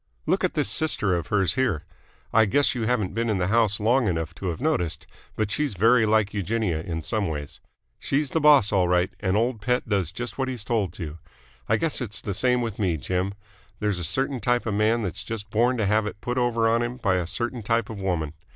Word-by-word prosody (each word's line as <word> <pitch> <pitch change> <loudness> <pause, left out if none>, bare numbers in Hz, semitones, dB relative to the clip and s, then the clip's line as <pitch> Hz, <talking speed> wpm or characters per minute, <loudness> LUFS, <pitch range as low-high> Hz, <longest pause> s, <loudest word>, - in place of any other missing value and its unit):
Look - - +1
at - - 0
this - - +1
sister 105 -5 +1
of 85 - -3
hers 95 -5 +2
here. 110 - 0 0.5
I 110 0 +6
guess 140 +8 +2
you 115 -4 -2
haven't 110 -6 0
been 115 +2 -1
in 105 - +1
the 90 0 0
house 110 -2 +3
long 120 +3 +2
enough 80 -2 -2
to 95 - -6
have 85 - -3
noticed, 90 - -1 0.3
but 110 -1 -1
she's 145 -4 -1
very 115 +3 +4
like 105 -2 +2
Eugenia 100 -4 -1
in 80 -2 -4
some 105 -3 -1
ways. 75 -3 -5 0.4
She's 145 +1 -1
the 160 - +1
boss 145 -8 +6
all 95 -3 +3
right, 90 +1 +2
and 95 0 +1
old 115 0 0
Pett 125 +3 0
does 100 -6 0
just 120 +3 -6
what 135 - 0
he's 125 -5 -4
told 110 -7 0
to. 80 -3 -7 0.5
I 110 - +4
guess 155 +2 -1
it's 105 -7 -3
the 100 - -4
same 125 +5 +2
with 115 -3 -4
me, 90 -6 +1
Jim. 95 +5 -2 0.4
There's 105 -3 -1
a - - -4
certain 130 - -1
type 120 +2 +1
of 115 - -1
man 110 +3 +2
that's 95 - -4
just 105 -3 -6
born 120 +3 +2
to 110 - 0
have 105 +1 +2
it 105 - -7
put 125 +3 -2
over 115 -2 +2
on 115 +1 +2
him 120 +1 -3
by 95 -7 +1
a 90 -2 -2
certain 120 +5 -3
type 115 +1 0
of 110 -2 -7
woman. 85 -6 -2
105 Hz, 235 wpm, -25 LUFS, 95-120 Hz, 0.5 s, I